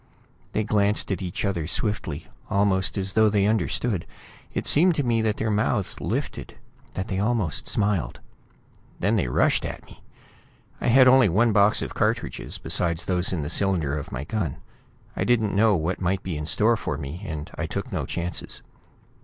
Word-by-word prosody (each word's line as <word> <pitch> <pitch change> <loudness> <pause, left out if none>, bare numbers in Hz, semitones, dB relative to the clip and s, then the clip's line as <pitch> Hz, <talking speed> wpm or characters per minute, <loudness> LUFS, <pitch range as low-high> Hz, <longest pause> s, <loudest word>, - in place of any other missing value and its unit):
They 110 - +1
glanced 105 -1 +1
at 95 - -2
each 90 +2 -3
other, 85 -6 -1
swiftly, 85 -7 -2 0.2
almost 100 -1 +1
as 95 0 -1
though 110 -1 +5
they 100 -1 +2
understood. 105 -1 0 0.4
It - - -3
seemed 170 +3 +4
to 145 - 0
me 115 -2 +1
that 110 -1 0
their 110 -1 -1
mouths 105 -1 0
lifted; - - -4 0.4
that 95 - -3
they 95 - -2
almost 105 -5 0
smiled. 100 -5 0 0.8
Then 105 +5 +2
they 95 - +1
rushed - - +2
at - - -6
me. - - -17 0.8
I - - -1
had 130 +2 +6
only 130 -4 +6
one 110 +7 +3
box 105 0 +4
of - - -5
cartridges, - - -2
besides 85 0 -1
those 90 -1 +1
in 85 -5 -2
the - - -4
cylinder 85 -8 +1
of 75 - -6
my 65 - -4
gun. 85 -3 -2 0.6
I - - -1
didn't 110 -5 +1
know 105 0 +4
what 85 +3 -2
might 95 +2 0
be 90 -4 -3
in 75 0 -4
store 110 +6 +3
for 75 -8 -3
me, 75 +5 -6
and 80 -3 -6
I - - -3
took - - -5
no - - -2
chances. 85 +1 -5
100 Hz, 180 wpm, -25 LUFS, 85-110 Hz, 0.8 s, had